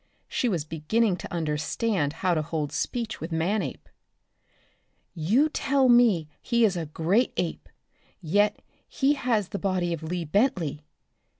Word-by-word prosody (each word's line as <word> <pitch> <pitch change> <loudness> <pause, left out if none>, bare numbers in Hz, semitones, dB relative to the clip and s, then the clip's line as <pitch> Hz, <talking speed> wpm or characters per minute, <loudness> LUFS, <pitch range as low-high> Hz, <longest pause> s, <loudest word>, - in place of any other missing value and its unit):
She 245 - 0
was 170 -8 -1
beginning 180 +6 0
to - - -9
understand 155 +2 -1
how 180 - +4
to 155 - +1
hold 155 -2 -3
speech 225 +8 -3
with 160 +2 -5
Manape. 180 +6 -1 1.3
"You 200 - +2
tell 275 -3 +1
me 230 -10 +5
he 235 -1 +3
is 195 -4 +1
a 165 -3 -3
great 175 - +1
ape, - - -3 0.5
yet 205 +5 +1 0.3
he 275 +1 +2
has 235 -8 0
the 200 - -4
body 185 -3 0
of 165 - -5
Lee 170 +1 -3
Bentley. 170 - 0
185 Hz, 140 wpm, -26 LUFS, 160-230 Hz, 1.3 s, me